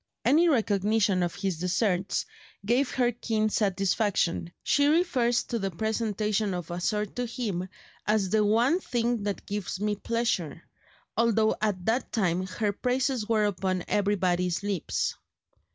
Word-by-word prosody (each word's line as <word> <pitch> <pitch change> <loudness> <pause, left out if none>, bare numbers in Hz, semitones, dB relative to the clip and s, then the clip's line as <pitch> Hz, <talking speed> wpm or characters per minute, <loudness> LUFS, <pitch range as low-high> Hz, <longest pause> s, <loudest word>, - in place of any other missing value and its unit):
Any 335 +4 +5
recognition 210 - +2
of 175 -1 -1
his 190 -4 -2
deserts 180 +1 0 0.4
gave 250 +5 +2
her 245 -2 +2
keen 220 -2 -1
satisfaction. 195 -4 0
She 285 0 +3
refers 270 -7 +2
to 235 - -3
the 195 -1 -1
presentation 215 0 -1
of 175 -2 -6
a 175 - -3
sword 210 +1 -1
to 245 0 -1
him 210 -7 -3 0.4
as 210 -3 +1
"the 220 - +3
only 230 - +3
thing 240 - -1
that 205 -1 -2
has - - -35 0.2
given 190 +3 -4
me 210 -1 +1
pleasure," 205 -9 -1 0.5
although 220 -1 +3
at 200 -4 -1
that 235 +4 0
time 185 -4 0
her 205 +2 -1
praises 250 0 -1
were 215 -2 +3
upon 185 -2 -1
everybody's 185 -3 +1
lips. 200 -5 -1
210 Hz, 145 wpm, -27 LUFS, 185-235 Hz, 0.5 s, Any